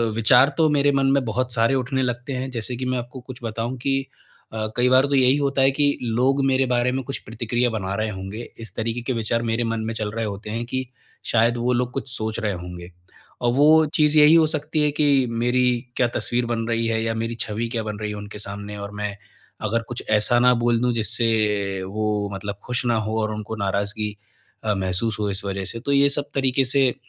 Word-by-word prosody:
विचार 125 +4 +5
तो 160 - +4
मेरे 145 -1 +3
मन 135 -1 +2
में 140 -1 +3
बहुत 125 +3 -1
सारे 115 +2 +3
उठने 130 +1 0
लगते 120 +2 -3
हैं 130 +1 -3
जैसे 120 0 -4
कि 130 +2 -4
मैं 125 0 0
आपको 125 +2 -6
कुछ 125 0 -10
बताऊँ 115 +2 -3
कि 135 +2 0 0.5
अ, 110 -1 -2
कई 125 +1 +3
बार 130 +1 +5
तो 140 - +1
यही 130 0 +5
होता 140 -1 +1
है 135 +1 +5
कि 145 +1 +1
लोग 125 +4 +1
मेरे 135 0 +3
बारे 125 0 +2
में 130 +1 -2
कुछ 135 +2 -4
प्रतिक्रिया 120 +2 -1
बना 100 -4 -3
रहे 110 +1 -1
होंगे 95 +2 -6 0.2
इस 115 -4 -8
तरीके 115 +2 -2
के 130 +2 -2
विचार 115 0 -1
मेरे 115 +1 0
मन 115 -1 -1
में 115 - -2
चल 110 -2 -3
रहे 115 +1 -2
होते 105 +1 -6
हैं 115 +2 -3
कि 130 +2 -3 0.4
शायद 115 +1 +2
वो 120 +1 +1
लोग 125 0 0
कुछ 135 0 -4
सोच 110 0 -3
रहे 110 -3 -1
होंगे। 90 0 -8 0.5
और 120 -1 +2
वो 155 +4 +6
चीज़ 150 0 +4
यही 150 +1 +8
हो 165 -1 +6
सकती 155 0 -2
है 150 - +2
कि 140 -3 +4
मेरी 120 +2 +1 0.3
क्या 125 - +3
तस्वीर 120 0 0
बन 115 -1 -2
रही 115 0 0
है 110 0 0
या 115 0 0
मेरी 115 +1 -2
छवि 110 +2 -2
क्या 115 -2 -2
बन 105 -1 -4
रही 105 -1 -3
है 105 - -5
उनके 105 0 -8
सामने 100 0 -7
और 100 0 -6
मैं 105 -1 -3 0.5
अगर 115 +2 +1
कुछ 120 - -5
ऐसा 110 +3 +3
ना 125 +1 +5
बोल 120 -1 +3
दूँ 125 -1 +2
जिससे 105 -3 0
वो 105 +1 -1
मतलब 100 +1 -5
खुश 125 0 -2
ना 120 -1 +2
हो 110 +1 -1
और 110 0 -1
उनको 110 +1 -5
नाराज़गी 105 +1 -2 0.5
अ, 105 - +1
महसूस 95 +3 -1
हो 105 -1 0
इस 100 0 -4
वज़ह 100 -1 -3
से 115 - -5
तो 135 +4 -3
ये 140 0 +5
सब 145 0 -3
तरीके 135 0 +2
से 135 +1 +3
अ, - - -8
115 Hz, 235 wpm, -23 LUFS, 110-130 Hz, 0.5 s, यही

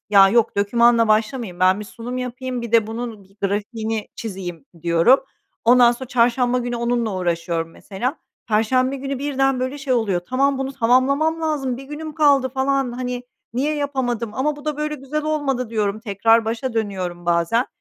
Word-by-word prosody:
"Ya, 195 -2 +7
yok 225 +1 +2
dokümanla 230 +3 +4
başlamayayım, 215 -3 0
ben 185 +2 +4
bir - - -6
sunum 235 +4 -6
yapayım, 250 0 -4
bir 235 -1 -6
de 225 -2 +5
bunun 225 -1 -6
g 195 +1 -23
grafiğini 215 +2 -2
çizeyim." 185 -8 -6 0.2
diyorum. 170 +10 +4 0.4
Ondan 240 0 +6
sonra 250 +1 -8
çarşamba 245 0 +2
günü 245 -1 -3
onunla 235 -2 -1
uğraşıyorum, 170 -2 -1
mesela. 240 - -4 0.3
Perşembe 255 +5 +2
günü, 275 0 -4
birden 270 -2 0
böyle 260 +3 -3
şey 275 -2 -2
oluyor, 215 -7 +1
"Tamam, 275 +2 +1
bunu 270 0 -3
tamamlamam 275 +6 +2
lazım, 290 -6 -1
1 270 - -9
günüm 300 +2 -7
kaldı, 285 -4 +4
falan, 265 0 0
hani, 250 0 -4 0.3
niye 285 +5 0
yapamadım? 250 -6 -2
Ama 290 +5 0
bu 290 - -12
da 305 -2 -2
böyle 300 0 -2
güzel 295 +2 -4
olmadı." 275 -6 -1
diyorum, 215 -2 -1
tekrar 225 +1 +3
başa 230 +3 -2
dönüyorum 185 -5 -3
bazen. 170 +8 +2
240 Hz, 170 wpm, -21 LUFS, 215-270 Hz, 0.4 s, Ya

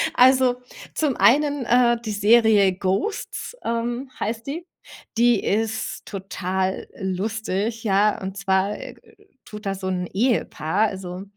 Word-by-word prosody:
Also, 255 0 +5 0.4
zum 295 -5 +1
einen, 285 0 +3
äh, 240 0 +4
die 220 - -3
Serie 210 -2 +4
„Ghosts“, 195 - -3
ähm, 240 +3 -2
heißt 225 +3 -3
die. 335 +5 -5 0.5
Die 235 -3 +4
ist 220 +2 -2
total 190 -1 -3
lustig, 215 +3 -2
ja. 205 0 +2
Und 190 +1 -5
zwar 195 +1 +1 0.7
tut 210 0 -10
da 195 0 -1
so 190 0 -5
'n 180 -1 -2
Ehepaar 210 - +1
also, 185 -1 -6
215 Hz, 120 wpm, -23 LUFS, 190-240 Hz, 0.7 s, Also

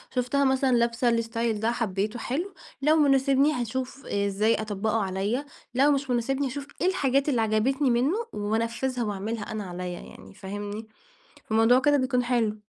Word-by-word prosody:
شفتها 250 +3 +1
مثلًا 265 0 +2
لابسة 235 +1 +2
الاستايل 230 -1 0
ده، 225 +2 +1
حبيته، 215 0 -2
حلو، 340 +13 -3 0.3
لو 305 +3 +4
مناسبني 275 -1 +4
هاشوف 255 +2 -4
إزاي 200 +2 +1
أطبّقه 215 +1 -1
عليَّ، 200 +8 -2 0.3
لو 275 +3 +5
مش 280 -1 -1
مناسبني 265 +3 0
أشوف 280 +2 -6
إيه 360 - +3
الحاجات 280 -6 +1
اللي 245 -5 +2
عجبتني 245 +6 +1
منه 255 +9 +2 0.2
وأنفذها 230 +4 -1
وأعملها 210 +1 -4
أنا 215 -1 -3
عليَّ، 180 0 -5
يعني 95 - -11
فاهمني؟ 205 - -6 0.6
فالموضوع 225 +3 +4
كده 290 +2 +3
بيكون 255 -2 +1
حلو. 230 -4 0
235 Hz, 150 wpm, -26 LUFS, 215-270 Hz, 0.6 s, لو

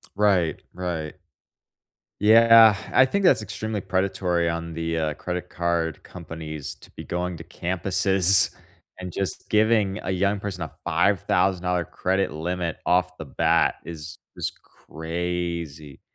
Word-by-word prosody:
Right, 95 -6 +2
right. 85 -4 -4 1.1
Yeah, 115 -1 +7 0.2
I 130 - +7
think 200 +9 -1
that's 135 -11 +5
extremely 105 0 -4
predatory 90 -2 0
on 85 0 -3
the, 80 0 -2
uh, 80 -2 0
credit 90 +2 -5
card 85 -2 -2
companies 80 -4 -7
to - - -18
be - - -9
going 90 0 -3
to 85 - -9
campuses 95 +2 +2 0.5
and 90 -1 -6
just 95 +2 -4
giving 105 -2 +2
a 95 - -2
young 100 +2 +1
person 95 -3 -5
a 80 - -4
$5000 90 -2 +1
credit 95 +3 -1
limit 85 +1 -3
off 90 0 +1
the 80 - -7
bat 70 - +2
is 80 0 -8 0.2
just - - -3
crazy. 85 -3 -5
90 Hz, 130 wpm, -24 LUFS, 85-95 Hz, 1.1 s, Yeah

